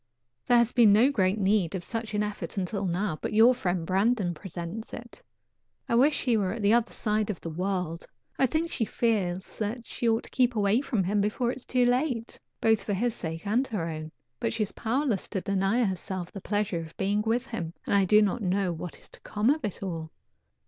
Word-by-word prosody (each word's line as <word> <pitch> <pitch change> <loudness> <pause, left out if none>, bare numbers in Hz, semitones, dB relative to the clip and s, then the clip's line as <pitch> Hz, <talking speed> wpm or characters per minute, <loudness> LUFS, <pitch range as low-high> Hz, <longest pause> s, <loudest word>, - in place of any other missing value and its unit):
There 245 - +6
has 235 0 +3
been 230 -4 +6
no 230 +7 +5
great 195 -5 +2
need 195 -3 +1
of 180 - -4
such 225 -3 -4
an 210 - +1
effort 210 0 -5
until 195 +1 -2
now, 175 -2 -1
but - - -3
your 230 +4 +7
friend 180 -8 -2
Brandon 195 0 +1
presents 175 +5 -7
it. 240 - -11 0.7
I - - -1
wish 275 +6 +4
he 240 -4 +3
were 190 -3 0
at 225 -2 -5
the 205 +2 +5
other 235 0 +2
side 215 -1 -1
of 200 - -3
the 165 - -6
world. 180 -1 -3 0.3
I 265 - +5
think 320 +6 -1
she - - 0
feels 195 -6 -1
that 225 +3 -3
she 235 - -1
ought 225 0 +1
to - - -9
keep 250 -2 +2
away 210 +3 +3
from 235 -8 0
him 200 +3 +1
before 225 +4 0
it - - -6
is 260 - -12
too 250 -1 +3
late, 245 -2 0 0.2
both 220 -2 +3
for 205 - -2
his 230 +4 0
sake 165 -4 -5
and 235 +6 +1
her 185 -7 -2
own, 155 -1 -5 0.3
but - - -1
she 220 -1 +1
is 205 - -5
powerless 240 -3 -1
to 190 - -3
deny 195 +5 +1
herself 185 -2 -3
the 195 - -8
pleasure 205 -3 -1
of 165 0 -9
being 200 +2 +1
with 230 +3 0
him, 185 -10 -4
and - - -1
I 200 -1 +4
do 210 +3 +6
not 210 +4 0
know 190 -1 0
what 165 +1 -7
is - - -14
to - - -16
come 215 +5 +1
of 310 +2 -1
it 205 -2 -4
all. 165 -4 -4
210 Hz, 225 wpm, -28 LUFS, 185-235 Hz, 0.7 s, your